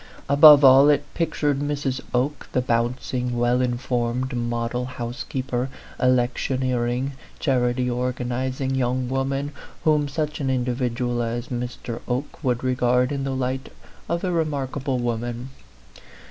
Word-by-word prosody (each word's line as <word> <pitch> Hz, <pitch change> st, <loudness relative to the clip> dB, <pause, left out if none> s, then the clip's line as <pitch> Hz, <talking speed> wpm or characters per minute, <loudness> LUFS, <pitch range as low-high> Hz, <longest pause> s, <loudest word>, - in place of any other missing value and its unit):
above 145 Hz, 0 st, +9 dB
all, 135 Hz, +2 st, +8 dB
it 145 Hz, 0 st, +3 dB
pictured 150 Hz, -4 st, 0 dB
Mrs. 145 Hz, -2 st, -2 dB
Oke, 130 Hz, +3 st, -1 dB
the -, -, +2 dB
bouncing, 125 Hz, +1 st, -1 dB
well 120 Hz, +1 st, +2 dB
informed, 125 Hz, 0 st, -1 dB
model 120 Hz, +1 st, -2 dB
housekeeper, 125 Hz, +1 st, -4 dB, 0.3 s
election 125 Hz, +1 st, +1 dB
eering, 125 Hz, +1 st, 0 dB, 0.3 s
charity 125 Hz, -3 st, +1 dB
organizing 125 Hz, +2 st, -2 dB
young 130 Hz, -1 st, 0 dB
woman, 135 Hz, +2 st, -1 dB, 0.3 s
whom 150 Hz, -2 st, +3 dB
such 150 Hz, +1 st, -3 dB
an 135 Hz, -2 st, -1 dB
individual 125 Hz, -1 st, -1 dB
as 120 Hz, +1 st, -3 dB
Mr. 120 Hz, -1 st, -5 dB
Oke 130 Hz, +5 st, -3 dB
would 125 Hz, -2 st, 0 dB
regard 125 Hz, 0 st, +2 dB
in 140 Hz, -1 st, -2 dB
the 135 Hz, -1 st, -2 dB
light 130 Hz, +1 st, -3 dB, 0.4 s
of 170 Hz, 0 st, -1 dB
a 185 Hz, -, 0 dB
remarkable 140 Hz, -5 st, -1 dB
woman. 120 Hz, +1 st, -3 dB
130 Hz, 125 wpm, -23 LUFS, 120-135 Hz, 0.4 s, above